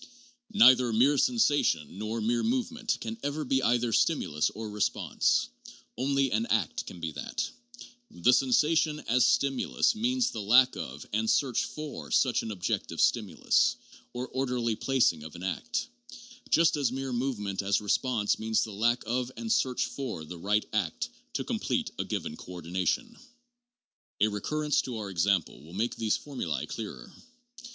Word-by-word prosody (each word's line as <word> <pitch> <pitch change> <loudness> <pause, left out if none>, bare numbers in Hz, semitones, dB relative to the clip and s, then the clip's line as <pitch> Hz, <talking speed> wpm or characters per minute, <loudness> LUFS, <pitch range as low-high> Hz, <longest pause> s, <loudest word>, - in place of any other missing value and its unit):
Neither 130 - +7
mere 130 +6 +4
sensation, 145 - +2
nor 110 +2 -3
mere 115 +2 +1
movement, 245 0 -1
can 225 0 -5
ever 145 +1 -3
be 135 +1 +1
either 120 -1 +1
stimulus 75 -6 +1
or 110 0 -7
response; 105 -1 0 0.5
only 135 +1 +1
an 110 +2 0
act - - -1
can 90 - -9
be 80 -1 -3
that; - - -4 0.6
the 125 +9 +3
sensation 150 +4 +3
as 125 +1 +3
stimulus 135 - +2
means 250 +3 0
the - - -5
lack 125 +5 +5
of 70 +3 -7
and 110 +1 +1
search 130 -4 +2
for 155 -2 -7
such 125 -3 +2
an 115 - -6
objective 95 -4 -3
stimulus, 105 -9 +2 0.4
or 125 +1 -4
orderly 125 -4 -1
plac 130 -4 +2
ing 80 - -13
of 80 - -10
an 90 - -9
act; 165 - -2 0.6
just 165 -1 +4
as 135 -5 +1
mere 135 0 -4
movement 110 -6 -2
as 100 +1 +1
response 105 +1 0
means 110 0 +1
the 110 - -5
lack 120 +4 +1
of 125 +2 -1
and 225 -1 -3
search 130 - +1
for 115 - -5
the 85 +2 -9
right 105 +4 +1
act 95 -7 -1 0.2
to - - -2
complete - - -2
a - - +1
given 75 - -4
coordination. 90 - -3 1.0
A 110 - +4
recurrence 150 +8 0
to 125 -3 -5
our 105 -2 -5
example 95 -1 0
will 80 +3 -14
make 110 +5 -1
these 110 -2 0
formulae 125 - -4
clearer. - - -7
120 Hz, 155 wpm, -29 LUFS, 100-135 Hz, 1.0 s, Neither